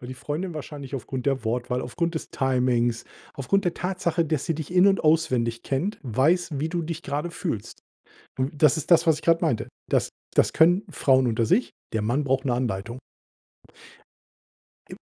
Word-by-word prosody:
Weil 125 Hz, -, -9 dB
die 130 Hz, -, -6 dB
Freundin 155 Hz, +8 st, -4 dB
wahrscheinlich 145 Hz, -3 st, -7 dB
aufgrund 130 Hz, 0 st, -5 dB
der 135 Hz, -3 st, 0 dB
Wortwahl, 125 Hz, +2 st, -1 dB
aufgrund 165 Hz, +8 st, -2 dB
des 160 Hz, -, -4 dB
Timings, 125 Hz, -3 st, +1 dB, 0.3 s
aufgrund 195 Hz, +9 st, 0 dB
der 175 Hz, -, +1 dB
Tatsache, 180 Hz, -2 st, -1 dB
dass 155 Hz, -3 st, -1 dB
sie 165 Hz, -, -1 dB
dich 155 Hz, +2 st, -6 dB
in 185 Hz, +1 st, +6 dB
und 195 Hz, -1 st, +3 dB
auswendig 125 Hz, -7 st, +2 dB
kennt, 170 Hz, +11 st, -2 dB
weiß, 145 Hz, +6 st, +1 dB
wie 155 Hz, +3 st, -1 dB
du 170 Hz, +1 st, -2 dB
dich 165 Hz, +1 st, -5 dB
grade 145 Hz, +4 st, -3 dB
fühlst. 115 Hz, -, -5 dB, 0.6 s
W 130 Hz, +1 st, 0 dB
das 150 Hz, -1 st, +4 dB
ist 160 Hz, +3 st, -5 dB
das, 170 Hz, -, +6 dB
was 160 Hz, -, +5 dB
ich -, -, -8 dB
grad 165 Hz, 0 st, +3 dB
meinte. 155 Hz, -10 st, 0 dB, 0.2 s
Das -, -, +1 dB, 0.3 s
das -, -, +3 dB
können 175 Hz, +5 st, +4 dB
Frauen 130 Hz, -5 st, +3 dB
unter 115 Hz, -1 st, +1 dB
sich. 230 Hz, -, +2 dB, 0.2 s
Der 110 Hz, -, 0 dB
Mann 120 Hz, +7 st, 0 dB
braucht 135 Hz, 0 st, 0 dB
'ne 125 Hz, -, +1 dB
Anleitung. 120 Hz, -1 st, -3 dB, 1.9 s
I -, -, -7 dB
140 Hz, 185 wpm, -25 LUFS, 125-165 Hz, 1.9 s, in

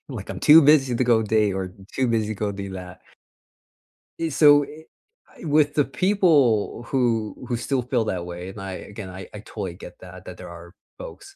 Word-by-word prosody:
Like, -, -, -7 dB
I'm -, -, -7 dB
too 155 Hz, +2 st, +8 dB
busy 140 Hz, -4 st, +4 dB
to 125 Hz, -, +1 dB
go 115 Hz, -2 st, +3 dB
date 105 Hz, -1 st, +1 dB
or 95 Hz, -1 st, -4 dB, 0.2 s
too 130 Hz, -, +1 dB
busy 110 Hz, -2 st, -1 dB
go 105 Hz, 0 st, -3 dB
do 100 Hz, -1 st, -7 dB
that. 90 Hz, -1 st, -9 dB, 1.3 s
So, 145 Hz, 0 st, +5 dB
i 155 Hz, +2 st, -13 dB, 0.6 s
I -, -, -9 dB
with 150 Hz, -1 st, +2 dB
the 145 Hz, -, +3 dB
people 140 Hz, -, +2 dB
who 115 Hz, -5 st, 0 dB
who 120 Hz, -, -1 dB
still 130 Hz, +2 st, -1 dB
feel 125 Hz, -2 st, 0 dB
that 90 Hz, -4 st, -3 dB
way 90 Hz, +1 st, -7 dB
and 95 Hz, -, -10 dB
I, 95 Hz, -1 st, -6 dB
again, 100 Hz, +1 st, -9 dB
I 95 Hz, +1 st, -9 dB, 0.2 s
totally 95 Hz, -5 st, -6 dB
get -, -, -12 dB
that -, -, -12 dB
that -, -, -9 dB
there -, -, -10 dB
are 85 Hz, +1 st, -12 dB, 0.2 s
folks. 400 Hz, -5 st, -11 dB
115 Hz, 190 wpm, -23 LUFS, 95-145 Hz, 1.3 s, too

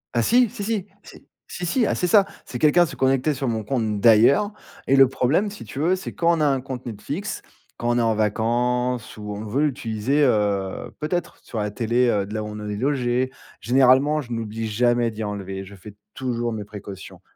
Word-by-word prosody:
Ah 120 Hz, -, +3 dB
si, 245 Hz, -, +4 dB
si, 230 Hz, -2 st, -6 dB
si. 210 Hz, -3 st, -1 dB, 0.2 s
Si, -, -, -15 dB, 0.2 s
si, 180 Hz, -, -5 dB
si, 230 Hz, +8 st, +1 dB
ah, -, -, 0 dB
c'est -, -, -1 dB
ça, 200 Hz, +2 st, +5 dB, 0.2 s
c'est 120 Hz, -, -6 dB
quelqu'un 155 Hz, +5 st, +5 dB
se 155 Hz, -, -8 dB
connectait 135 Hz, +3 st, +2 dB
sur 135 Hz, -1 st, -3 dB
mon 110 Hz, -2 st, -1 dB
compte, 110 Hz, -3 st, -1 dB
d'ailleurs. 120 Hz, -, +5 dB, 0.4 s
Et 135 Hz, -, +4 dB
le 135 Hz, -1 st, +7 dB
problème, 135 Hz, +10 st, +1 dB
si 205 Hz, -, -10 dB
tu 135 Hz, -, -7 dB
veux, 170 Hz, +5 st, +2 dB
c'est 190 Hz, -, -7 dB
quand 170 Hz, 0 st, +2 dB
on -, -, -3 dB
a -, -, +3 dB
un 135 Hz, -2 st, +1 dB
compte 130 Hz, -1 st, -7 dB
Netflix, 145 Hz, -, -5 dB, 0.4 s
quand 120 Hz, -, -2 dB
on 120 Hz, -, +2 dB
est -, -, +3 dB
en 115 Hz, -1 st, +2 dB
vacances 120 Hz, +3 st, 0 dB
ou 105 Hz, -1 st, -6 dB
on 105 Hz, +1 st, -6 dB
veut 115 Hz, +7 st, 0 dB
l'utiliser, 125 Hz, 0 st, 0 dB
heu, 100 Hz, -6 st, 0 dB
peut-être 170 Hz, +3 st, -3 dB
sur 115 Hz, -, -8 dB
la 105 Hz, 0 st, -2 dB
télé, 120 Hz, +3 st, +1 dB
heu, 100 Hz, -3 st, +1 dB
de 105 Hz, -, -8 dB
là 110 Hz, -, -2 dB
où -, -, -5 dB
on 105 Hz, 0 st, -7 dB
est 105 Hz, -, -3 dB
logés. 130 Hz, 0 st, 0 dB, 0.3 s
Généralement, 130 Hz, +6 st, +4 dB
je 120 Hz, -4 st, -11 dB
n'oublie 115 Hz, -1 st, -3 dB
jamais 120 Hz, +2 st, +2 dB
d'y 110 Hz, 0 st, -6 dB
enlever. 95 Hz, -2 st, -5 dB
Je 100 Hz, -, -13 dB
fais 100 Hz, +2 st, -12 dB, 0.2 s
toujours 120 Hz, -3 st, -2 dB
mes 105 Hz, -2 st, -4 dB
précautions, 100 Hz, -2 st, -10 dB
120 Hz, 220 wpm, -23 LUFS, 105-145 Hz, 0.4 s, le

